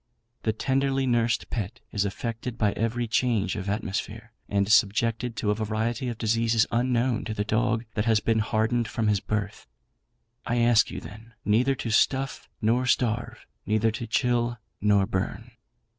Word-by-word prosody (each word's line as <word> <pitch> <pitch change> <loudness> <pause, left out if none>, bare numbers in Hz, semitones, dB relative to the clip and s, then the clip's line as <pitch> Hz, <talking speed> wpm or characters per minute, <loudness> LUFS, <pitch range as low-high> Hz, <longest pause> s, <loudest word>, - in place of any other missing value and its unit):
The 110 - +1
tenderly 135 +3 0
nursed 120 -2 +1
pet 100 -5 -3
is 100 -1 0
affected 115 +4 -4
by 105 -3 +2
every 115 +3 -1
change 115 -2 +1
of 100 -2 -4
atmosphere, 105 +2 -3 0.2
and 100 -1 +1
subjected 115 +3 +2
to 105 -1 0
a - - +3
variety 110 +4 -2
of 120 - -5
diseases 115 0 +2
unknown 120 0 +1
to 110 - -4
the 105 - 0
dog 110 +2 0
that 105 -1 -1
has 110 -2 +4
been 110 +1 +1
hardened 110 +2 +1
from 110 -1 -1
his 105 -1 +2
birth. 105 0 -4 0.8
I 120 - -1
ask 120 -2 +4
you, - - -6
then, 110 +2 -12
neither 125 +6 +3
to 115 -2 -4
stuff 135 +5 +1
nor 120 +4 +2
starve; 120 -1 0 0.2
neither 110 +2 +2
to 115 +2 -5
chill 120 +1 +1 0.2
nor 100 -1 +4
burn. 95 -2 -3
115 Hz, 160 wpm, -26 LUFS, 105-120 Hz, 0.8 s, has